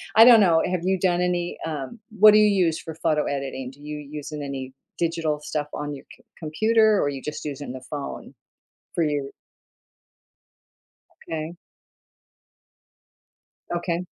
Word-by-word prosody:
I 225 +1 +10
don't 235 -3 +9
know, 165 -4 +5
have 180 -2 -1
you 190 -1 +1
done 180 -1 +2
any, 175 -1 -1
um 155 - -5 0.2
what 215 +1 +10
do 215 - +7
you 210 - +6 0.2
use 165 -1 0
for 160 -2 -8
photo 155 -2 +1
editing? 135 -2 -4
Do 145 +2 -19
you 150 0 -6
use 150 +1 -8
any 140 -3 -5 0.3
digital 165 -3 0
stuff 150 -1 -3
on 145 0 -4
your 135 - -12
com - - -25 0.2
computer 215 +7 +3
or - - +2
are - - +1
you 135 -2 -5
just 150 - -5
using 145 -2 -5
the 130 - -8
phone 140 +1 -7 0.6
for 170 - +1
your 145 -2 -1 2.0
Okay. 160 +1 -4 2.2
Okay. 175 0 -2
155 Hz, 150 wpm, -24 LUFS, 145-175 Hz, 2.2 s, I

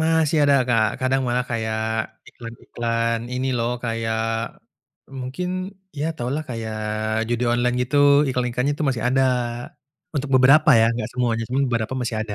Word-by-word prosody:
Masih 160 -1 +2
ada, 140 -1 +5
Kak, 115 -2 +3
kadang 130 +1 +1
malah 125 +1 0
kayak 110 -1 -2 0.5
iklan-iklan 115 0 -3
ini 130 +1 -2
loh, 115 +1 0
kayak, 115 -1 -1 1.0
mungkin 135 +9 -4 0.5
ya 150 - -1
tahulah 135 +5 -2
kayak 110 -2 -4 0.5
judi 120 +1 0
online 125 0 +1
gitu 130 +4 -2 0.3
iklan-iklan 125 -1 -1
nya 145 - +2
itu 155 - -2
masih 115 -3 -3
ada 135 +1 +2 0.9
untuk 140 -1 -2
beberapa 140 +5 +6
ya - - +5
enggak 115 -2 -3
semuanya, 120 -2 0
cuma 130 +2 0
beberapa 115 +1 -1
masih 120 -2 -2
ada. 110 -2 -5
125 Hz, 150 wpm, -22 LUFS, 115-135 Hz, 1.0 s, beberapa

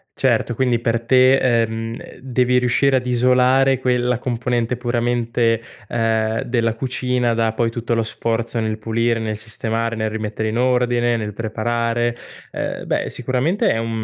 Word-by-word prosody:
Certo, 120 - +1
quindi 125 -1 +1
per 115 0 0
te, 130 +1 +5
ehm, 115 -2 0
ehm, - - -12
devi 125 -1 +1
riuscire 125 +2 +2
ad 125 -1 0
isolare 125 +2 +3
quella 125 -1 +1
componente 120 0 -1
puramente, 120 -1 0 0.3
ehm, 110 -1 0
della 115 -2 0
cucina 125 -1 -1
da 115 -1 +1
poi 115 +1 0
tutto 115 0 -3
lo 115 - +2
sforzo 115 +1 -2
nel 110 -1 -2
pulire, 115 +1 0
nel 110 -1 -3
sistemare, 115 +1 -3
nel 110 0 -1
rimettere 110 0 -3
in 110 - -2
ordine, 120 -1 +2
nel 105 -2 -4
preparare. 115 +2 -1 0.4
Eh - - -4
beh, - - -1
sicuramente 130 - 0
è 115 - 0
un, 115 0 -2
120 Hz, 155 wpm, -20 LUFS, 115-125 Hz, 0.4 s, te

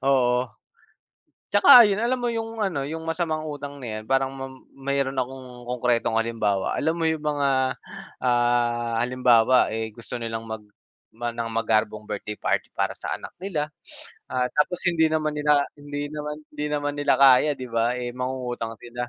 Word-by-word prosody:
Oo. 125 -2 +3 1.0
'Tsaka 240 +4 +9
ayun, 205 -1 +2
alam 240 +3 +1
mo 240 -1 -1
yung 225 -1 -3
ano, 145 -8 -1
yung 160 +1 -5
masamang 160 -1 -2
utang 145 -2 -6
na 110 -3 -4
'yan, - - -10
parang 135 0 +1
mam 135 -1 -9
mayroon 135 0 -2
akong 125 -1 -6
konkretong 120 -2 +1
halimbawa. 110 -4 0
Alam 160 +1 +1
mo 165 - -2
yung 160 -1 -1
mga, 140 -3 +1 0.5
ah, 120 -1 +1
halimbawa, 125 -1 +4
eh, 110 0 -3
gusto 115 +3 -9
nilang 115 -1 -4
mag 110 -1 -6 0.5
gumawa 120 +1 -5
ng 115 -1 -3
magarbong 110 -1 0
birthday 105 0 -5
party - - -1
para - - -1
sa - - -4
anak - - -10
nila. 165 -6 -3 0.6
Ah, 125 -1 +1
tapos 170 +4 +1
hindi 160 -2 +3
naman 155 -1 0
nila 150 -1 +3
hindi 145 0 -5
naman 150 0 -5 0.2
hindi 150 0 -3
naman 145 -1 -1
nila 145 -2 +2
kaya, 135 +2 +6
'di 130 - -5
ba? 120 +1 0
Eh, 120 -1 -4
mangungutang 125 -3 -4
sila. 120 +2 -7
130 Hz, 165 wpm, -24 LUFS, 120-150 Hz, 1.0 s, Tsaka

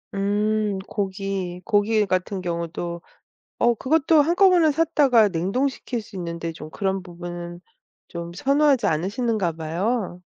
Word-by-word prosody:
음. 205 0 0
고기, 195 -3 -3
고기 210 +1 +2
같은 185 0 -1
경우도 170 0 -4 0.6
어 240 0 +3
그것도 310 +5 +3
한꺼번에 345 0 +4
샀다가 285 -8 +4
냉동시킬 235 +7 -2
수 205 - -12
있는데 170 -2 -4
좀 155 -1 -10
그런 190 +2 -2
부분은 175 -1 -8 0.5
좀 170 0 -6
선호하지 275 +1 +3
않으시는가 200 +3 0
봐요. 175 +5 -2
195 Hz, 275 characters per minute, -23 LUFS, 175-240 Hz, 0.6 s, 한꺼번에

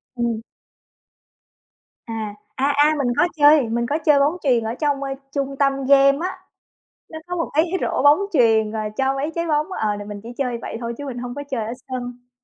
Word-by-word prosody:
Ừm. 235 -2 -1 1.6
À, 220 -3 -5 0.2
à, 275 +2 +1
à, 300 +2 +5
mình 275 -3 0
có - - +4
chơi, 290 -4 +6
mình 235 +1 0
có 295 - +1
chơi 295 -2 +5
bóng 295 +5 +2
chuyền 245 -5 +2
ở 225 +1 -2
trong, 285 -2 0
ơ, 275 - -3 0.2
trung 275 -1 -2
tâm 275 -1 +1
game 275 0 +5
á. 370 +1 -3 0.7
Nó 315 - -8
có 355 0 -4
một 330 - -2
cái 310 +2 +4 0.2
rổ - - -1
bóng 290 +3 +6
chuyền 225 -6 +3
rồi 215 -1 -3
cho 270 0 +1
mấy 280 +3 -2
trái 335 0 -2
bóng, 305 -1 +1
ờ, 215 - -1
là 205 - -7
mình 205 0 -7
chỉ 230 - -10
chơi 250 -4 -1
vậy - - -5
thôi 235 0 -4
chứ 285 - -6
mình 250 -3 -5
hông 245 0 -5
có 285 - -5
chơi 230 -5 -2
ở 225 - -4 0.2
sân. 245 -1 -6
270 Hz, 215 wpm, -21 LUFS, 235-290 Hz, 1.6 s, chơi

